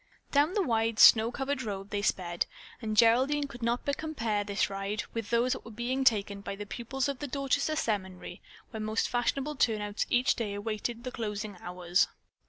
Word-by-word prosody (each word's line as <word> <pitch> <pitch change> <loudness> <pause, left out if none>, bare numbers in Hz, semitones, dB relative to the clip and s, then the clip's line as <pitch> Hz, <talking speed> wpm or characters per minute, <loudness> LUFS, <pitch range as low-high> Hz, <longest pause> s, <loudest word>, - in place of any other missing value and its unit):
Down 295 +5 +3
the 410 - +3
wide, 225 -5 +1
snow 225 +1 +8
covered 270 +2 -2
road 200 -3 -5
they 205 - -1
sped, 175 -4 0 0.3
and 215 -2 -3
Geraldine 260 +6 +4
could 255 -3 -11
not 235 +1 0
but 285 0 0
compare 235 -10 -1
this 200 0 0
ride 200 +2 -3
with 225 -2 -4
those 235 +2 +2
that - - -7
were - - -10
being 240 +4 -2
taken 205 -5 +2
by 200 - -5
the 205 +1 -6
pupils 255 +5 -3
of 280 -2 -3
the 290 - -4
Dorchester 275 +3 0
Seminary, 190 -8 -3 0.3
where 220 - -5
most 215 +1 0
fashionable 275 +4 -1
turnouts 210 -4 0
each 245 +1 +3
day 210 -4 -3
awaited 220 +3 -3
the 255 - -4
closing 210 -3 -4
hours. 180 0 +1
225 Hz, 190 wpm, -30 LUFS, 205-260 Hz, 0.3 s, snow